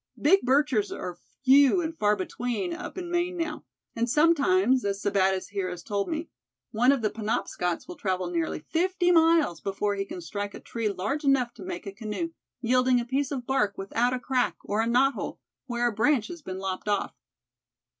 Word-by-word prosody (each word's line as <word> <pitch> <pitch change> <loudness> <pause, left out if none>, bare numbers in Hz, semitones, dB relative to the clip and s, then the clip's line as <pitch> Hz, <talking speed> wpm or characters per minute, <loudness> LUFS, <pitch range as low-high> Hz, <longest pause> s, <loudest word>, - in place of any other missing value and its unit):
Big 380 +7 +5
birches 260 -5 +2
are 180 -1 -6 0.3
few 280 +6 +6
and 325 -1 -3
far 210 -6 +2
between 245 - -3
up 360 +2 -7
in 350 -1 -5
Maine 350 +1 0
now, 335 0 -3 0.3
and 235 +1 0
sometimes, 305 -1 +3
as 200 -1 -1
Sebattis 190 -2 +1
here 195 -2 -2
has 180 -1 -7
told 200 -2 -2
me, 320 +1 -3 0.4
one 245 +4 +4
of 270 -5 0
the 215 - +1
Penobscots 195 -5 -2
will 355 -1 -8
travel 185 -3 -1
nearly 165 -2 -1
fifty 355 - +1
miles 325 - +4
before 200 +1 -1
he 195 -1 -2
can 195 - -7
strike 200 +4 -5
a - - -8
tree 230 -2 -3
large 205 +10 -2
enough 270 -4 +2
to - - -14
make 360 -8 -6
a 200 - -5
canoe, 215 - -4 0.3
yielding 250 +1 +3
a 240 - -3
piece 270 +3 -1
of 260 -4 -4
bark 210 -7 +1
without 230 +5 0
a 255 - -1
crack, 250 -1 0
or 210 +2 0
a 225 - 0
knot 260 +4 +4
hole, - - -5 0.3
where 240 -1 0
a - - 0
branch 230 +2 +2
has 340 -2 -8
been 185 -9 -6
lopped 190 +1 -4
off." 205 -1 0
240 Hz, 195 wpm, -27 LUFS, 200-300 Hz, 0.4 s, few